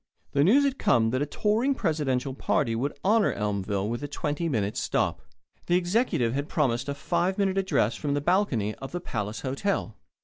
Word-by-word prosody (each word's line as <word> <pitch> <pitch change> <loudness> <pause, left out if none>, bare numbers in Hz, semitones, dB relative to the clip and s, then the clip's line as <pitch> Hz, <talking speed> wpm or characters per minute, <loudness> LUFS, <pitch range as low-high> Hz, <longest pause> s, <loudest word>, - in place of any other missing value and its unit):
The 140 - +3
news 245 - +5
had 275 -1 0
come 115 -2 +3
that 130 +2 0
a 145 - 0
touring 225 - +1
presidential 145 - -1
party 130 -3 0
would 140 +5 -2
honour 215 +1 +4
Elmville 100 -1 -2
by 120 - -7
a - - -2
twenty 150 +3 -2
minute 105 -6 -1
stop. - - 0 0.5
The 175 - +3
Executive 180 - +1
had 140 +3 -2
promised 130 -3 0
a 140 - -2
five 175 +6 0
minute 195 -1 +1
address 185 - +1
from 145 -2 -1
the - - +1
balcony 145 - +1
of 135 +6 -9
the 175 - -2
Palace 105 - -4
Hotel. 135 - -2
145 Hz, 190 wpm, -27 LUFS, 120-185 Hz, 0.5 s, news